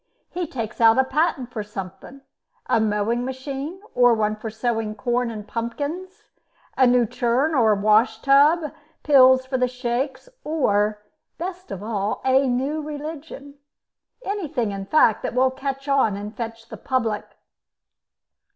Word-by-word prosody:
He 355 -1 -3
takes 235 -4 -5
out 225 +1 +6
a 265 - +5
patent 265 -2 -1
for 220 - -4
something 205 +6 -9 0.4
a - - +2
mowing 220 +2 0
machine, 270 +6 -5
or 245 -1 +5
one 215 -1 0
for 215 +1 -6
sowing 220 -1 -2
corn 240 +2 -1
and 215 -2 -7
pumpkins, 285 +11 -5 0.5
a 260 - +5
new 245 -1 +4
churn 245 +8 0
or 225 -6 +4
wash 215 +3 +3
tub, 295 +3 +4 0.3
pills 260 -3 +6
for 260 0 -2
the 250 - +2
shakes, 250 - -3 0.2
or, 210 -9 0 0.3
best 365 +1 -6
of 195 0 -6
all, 210 -2 -2
a 265 +1 +4
new 270 +5 -1
religion 295 -1 -8 0.7
anything, 310 - -2
in 195 -1 -6
fact, 235 -6 +4
that - - -4
will 260 +1 +3
catch 270 +1 -5
on 265 -8 +2
and 210 +2 -7
fetch 230 -1 -7
the - - -8
public." 230 -5 -2
250 Hz, 145 wpm, -23 LUFS, 220-280 Hz, 0.7 s, out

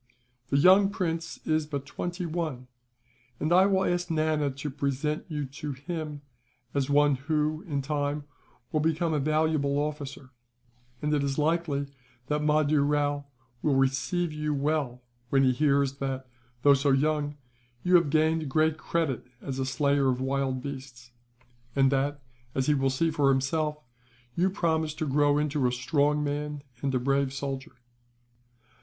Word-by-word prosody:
The 140 - +2
young 190 +6 +6
prince 165 -5 -3
is 155 -1 +1
but 140 -3 -4
twenty 175 +5 -4
one, 155 -6 -3 0.7
and 155 +3 +1
I 185 +2 +6
will 190 -1 +2
ask 175 0 0
Nana 155 -2 +1
to 140 +2 -5
present 140 +2 -2
you 150 -3 -2
to 140 +2 -6
him 150 +1 -5 0.5
as 140 -1 0
one 145 -1 +4
who, 150 +2 -1
in 140 -4 -2
time, 145 0 -1 0.5
will 155 - +1
become 160 +1 +1
a 150 - +1
valuable 155 -1 +1
officer; 145 -3 -4 0.7
and 150 0 +1
it 145 - +2
is 140 -1 -1
likely 155 -2 +1 0.4
that 150 0 +1
Mahdoo 150 -1 +3
Rao 145 0 +1 0.4
will 145 -3 +2
receive 135 +6 +1
you 150 -1 -1
well 140 -4 -1 0.3
when 135 +1 +4
he 130 - +5
hears 140 0 +2
that, 135 -1 -3 0.4
though 145 - +7
so 140 +1 +2
young, 145 +1 +1 0.5
you 180 - +1
have 170 -4 +6
gained 155 0 +2
great 155 +2 +2
credit 155 -7 -1
as 135 0 -5
a 130 - -1
slayer 140 0 +2
of 125 -1 0
wild 130 -1 -1
beasts; 130 -3 -8 0.6
and 135 -1 +4
that, 140 +1 0 0.3
as 130 - +1
he 150 - +3
will 135 -1 +2
see 160 +5 +1
for 145 -3 +2
himself, 150 +3 +1 0.6
you 180 +6 +2
promise 160 -5 0
to 155 - -2
grow 145 +1 +3
into 150 -3 +1
a - - 0
strong 145 +4 +1
man, 145 0 -3 0.2
and 135 -2 0
a - - +2
brave 135 +1 +1
soldier. 135 -1 -5
145 Hz, 160 wpm, -28 LUFS, 135-155 Hz, 0.7 s, though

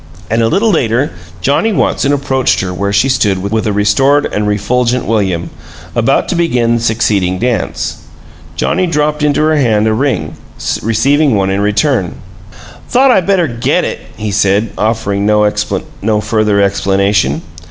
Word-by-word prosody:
And 115 +1 +2
a 115 - +2
little 215 - +2
later 130 - 0 0.3
Johnnie 145 - +1
Watson 140 -6 +1
approached 135 -2 +1
her 90 -1 -3
where 100 +2 -2
she 100 +6 +2
stood 105 -7 +1
with 110 +4 -2
a - - +1
restored 135 +8 +2
and 105 0 -2
refulgent 120 +4 0
William, 95 -6 -1 0.4
about - - +1
to - - -1
begin 120 -9 +1
the - - -4
succeeding 105 -5 0
dance. 115 -2 -2 0.6
Johnnie 185 - 0
dropped 150 -2 0
into 150 0 +1
her 155 0 +2
hand 110 -6 +2
a 110 - +2
ring, 110 - -1 0.5
receiving 135 +5 +2
one 95 -1 0
in 100 +1 0
return. 105 - 0 0.4
"I - - -20 0.4
thought 260 +2 +4
I 195 - +4
better 185 -2 +1
GET 120 -2 0
it," - - -4 0.2
he 105 -1 -3
said, 100 +2 +1
offering 105 -2 -1
no 105 0 +3 0.7
further 105 -1 +1
explanation. 100 -6 +1
110 Hz, 155 wpm, -13 LUFS, 100-140 Hz, 0.7 s, thought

